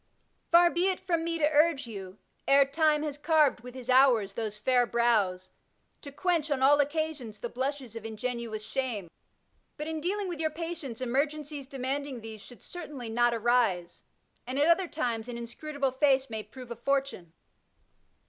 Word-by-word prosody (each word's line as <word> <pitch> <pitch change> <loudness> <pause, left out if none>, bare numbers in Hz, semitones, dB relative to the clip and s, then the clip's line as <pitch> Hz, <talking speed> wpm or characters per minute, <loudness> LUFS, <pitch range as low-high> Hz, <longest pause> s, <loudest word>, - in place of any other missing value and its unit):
Far 345 0 +6
be 350 +2 +1
it 375 - -1
from 335 -3 -1
me 335 0 -1
to 300 -2 +3
urge 300 -2 +3
you, 195 -4 -8 0.3
ere 275 0 +6
Time 300 +1 +2
has 295 -2 -4
carved 305 -3 +3
with 250 +2 -11
his 255 -2 -8
hours 250 -6 +4
those 215 -1 -4
&ur 250 -2 +4
brows, 210 -7 +1 0.5
to 285 - -9
quench 330 0 0
on 270 -2 0
all 290 +2 +6
occasions 290 -6 -1
the 240 - -5
blushes 260 -2 -3
of 230 - -6
ingenuous 225 -1 -4
shame, 225 -9 -3 0.7
but 300 - -4
in 320 0 -4
dealing 395 +4 -1
with 345 -3 -5
your 315 -1 +1
patients 310 -6 -6
emergencies 285 +2 -2
demanding 270 -1 -3
these 220 -1 -8
should 245 -2 -13
certainly 290 -9 -7
not 240 +1 +3
arise, 225 -7 +1 0.5
and 255 +2 -3
at 290 - +4
other 345 +2 +4
times 240 -8 -2
an 240 - -5
inscrutable 275 +4 -3
face 265 -1 +2
may 220 -1 -3
prove 240 +3 -12
a - - -3
fortune. 275 -8 -2
265 Hz, 170 wpm, -29 LUFS, 235-305 Hz, 0.7 s, Far